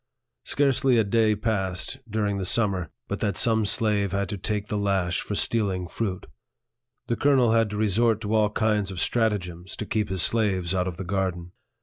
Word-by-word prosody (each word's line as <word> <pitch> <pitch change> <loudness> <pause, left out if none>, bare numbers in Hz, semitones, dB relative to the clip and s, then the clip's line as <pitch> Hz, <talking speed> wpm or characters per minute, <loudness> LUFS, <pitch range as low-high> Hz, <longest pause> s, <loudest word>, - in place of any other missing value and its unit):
Scarcely 135 -3 +2
a 110 - +4
day 110 +1 +2
passed, 95 +1 -2
during 105 -2 -1
the - - -2
summer, 95 -5 0 0.2
but 100 - -4
that 100 -3 -1
some 110 -2 +3
slave 100 -3 +1
had 100 -1 -1
to 105 - -3
take 105 +1 -1
the - - -3
lash 95 -3 0
for 105 - -4
stealing 100 -5 0
fruit. 95 +1 -4 0.8
The 120 - -1
colonel 130 -3 +3
had 115 -1 +3
to 105 - -5
resort 110 +1 +2
to 105 0 -3
all 110 -1 +3
kinds 105 -2 0
of 95 - -7
strat 115 +5 +2
agems 90 -3 -6
to 110 - -5
keep 105 -1 -1
his 95 -2 0
slaves 95 -6 +1
out 90 -1 0
of 90 -2 -5
the 95 - -5
garden. 90 -2 -2
105 Hz, 195 wpm, -25 LUFS, 95-110 Hz, 0.8 s, a